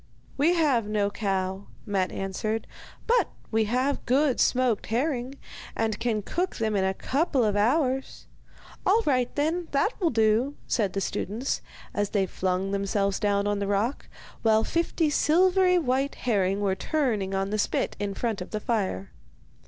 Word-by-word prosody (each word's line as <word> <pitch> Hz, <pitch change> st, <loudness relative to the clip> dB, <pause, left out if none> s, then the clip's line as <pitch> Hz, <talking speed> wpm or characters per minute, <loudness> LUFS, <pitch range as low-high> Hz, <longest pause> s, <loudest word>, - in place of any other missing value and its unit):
'We 320 Hz, +6 st, +3 dB
have 275 Hz, -10 st, +2 dB
no 205 Hz, -1 st, 0 dB
cow,' 195 Hz, -1 st, -2 dB, 0.2 s
Matte 195 Hz, -3 st, 0 dB
answered; 215 Hz, +3 st, -3 dB, 0.4 s
'but 485 Hz, +1 st, +3 dB, 0.2 s
we 220 Hz, 0 st, +2 dB
have 255 Hz, +6 st, 0 dB
good 265 Hz, +1 st, +2 dB
smoked 250 Hz, -4 st, +2 dB
herring, 255 Hz, +2 st, -1 dB, 0.4 s
and 220 Hz, -2 st, -1 dB
can 225 Hz, -3 st, -1 dB
cook 360 Hz, -, -2 dB
them 220 Hz, -2 st, -1 dB
in 195 Hz, -, +2 dB
a 190 Hz, 0 st, 0 dB
couple 275 Hz, -, +1 dB
of 210 Hz, -2 st, +1 dB
hours.' 260 Hz, +5 st, 0 dB, 0.6 s
'All 435 Hz, +5 st, +3 dB
right, 255 Hz, -3 st, +2 dB
then, 320 Hz, +4 st, 0 dB
that 280 Hz, -, +2 dB
will 340 Hz, -, +3 dB
do,' 225 Hz, +4 st, +2 dB
said 205 Hz, -6 st, 0 dB
the 195 Hz, -, -1 dB
students, 225 Hz, +8 st, -2 dB, 0.3 s
as 205 Hz, -1 st, 0 dB
they 200 Hz, -2 st, +1 dB
flung 185 Hz, +1 st, -1 dB
themselves 200 Hz, 0 st, 0 dB
down 200 Hz, -1 st, +1 dB
on 205 Hz, 0 st, 0 dB
the 200 Hz, -, -2 dB
rock, 205 Hz, +7 st, -1 dB, 0.3 s
while 220 Hz, -1 st, +4 dB
fifty 335 Hz, -2 st, 0 dB
silvery 360 Hz, +4 st, +4 dB
white 270 Hz, -3 st, 0 dB
herring 200 Hz, -4 st, 0 dB
were 195 Hz, -2 st, +1 dB
turning 215 Hz, -6 st, -1 dB
on 195 Hz, +1 st, -1 dB
the 215 Hz, -, -1 dB
spit -, -, 0 dB
in 200 Hz, -1 st, -3 dB
front 225 Hz, -5 st, -2 dB
of 180 Hz, -, -6 dB
the 215 Hz, -, -3 dB
fire. 195 Hz, -, -2 dB
225 Hz, 160 wpm, -26 LUFS, 200-275 Hz, 0.6 s, while